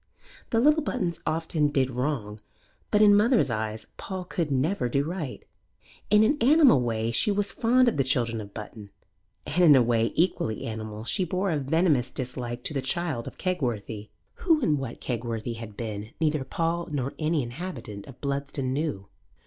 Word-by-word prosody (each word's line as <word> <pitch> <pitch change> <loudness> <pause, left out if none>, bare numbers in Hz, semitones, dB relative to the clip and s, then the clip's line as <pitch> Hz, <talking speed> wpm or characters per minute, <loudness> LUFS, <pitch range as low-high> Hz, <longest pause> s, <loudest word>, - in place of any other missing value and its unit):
The 225 - +2
little 300 +5 +5
Buttons 185 - -2
often 160 -1 +1
did 135 -3 +1
wrong; 125 -5 -2 0.5
but 210 0 +4
in 205 - +8
the 205 - +6
mother's 220 - +3
eyes 110 0 -3
Paul 190 -1 -5
could 170 -3 -2
never 140 +2 0
do 140 +3 +1
right. 160 -4 -5 0.6
In 210 +1 +6
an 290 +7 +2
animal 275 - +6
way 115 -1 -1
she 120 - +2
was 200 0 0
fond 250 +2 +3
of 235 - +1
the 135 - +3
children 120 -4 0
of 100 -1 -10
Button, 105 -1 -9 0.6
and 180 +5 +1
in 155 -4 +8
a 130 - +6
way 115 -1 +1
equally 160 -10 0
animal 110 -1 -5
she 150 +10 0
bore 185 +2 -1
a 155 - 0
venomous 145 -2 +2
dislike 125 -2 -5
to - - -4
the 135 - -1
child 150 -3 -2
of - - -9
Kegworthy. 115 - -3 0.3
Who 330 -4 +3
and 150 -7 +2
what 130 -3 -6
Kegworthy 115 -1 -3
had 110 -3 -9
been 105 -2 -5
neither 155 -3 +1
Paul 170 +4 -2
nor 135 -2 -2
any 155 -2 +1
inhabitant 120 - -7
of 135 - -12
Bludston 140 -2 -2
knew. 140 -10 -2
140 Hz, 180 wpm, -27 LUFS, 115-180 Hz, 0.6 s, in